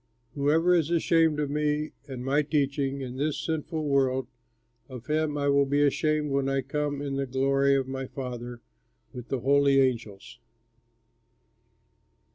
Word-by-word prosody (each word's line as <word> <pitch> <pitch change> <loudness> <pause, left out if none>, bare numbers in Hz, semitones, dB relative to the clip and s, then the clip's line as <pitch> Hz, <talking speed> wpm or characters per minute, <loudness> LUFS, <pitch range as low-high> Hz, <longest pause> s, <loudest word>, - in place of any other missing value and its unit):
Whoever 155 +5 +2
is 165 -3 +2
ashamed 165 -2 +2
of 145 -2 -1
me 150 0 -1 0.2
and 130 -2 -7
my 140 +3 +2
teachings 140 -2 -1
in 125 0 -7
this 150 +2 -1
sinful 160 0 -3
world, 130 -2 +1 0.6
of 125 -2 -9
him 150 +1 0
I 145 0 0
will 140 0 +3
be 145 +1 +2
ashamed 150 +1 0
when 135 0 0
I 135 -1 0
come 145 +1 -3
in 140 -1 -3
the 135 0 -2
glory 135 +1 +2
of 135 -1 0
my 135 0 -5
Father 120 -2 -7 0.5
with 125 -1 -8
the 135 -3 -3
holy 140 +1 +4
angels." 115 -7 -2
140 Hz, 150 wpm, -27 LUFS, 135-150 Hz, 0.6 s, holy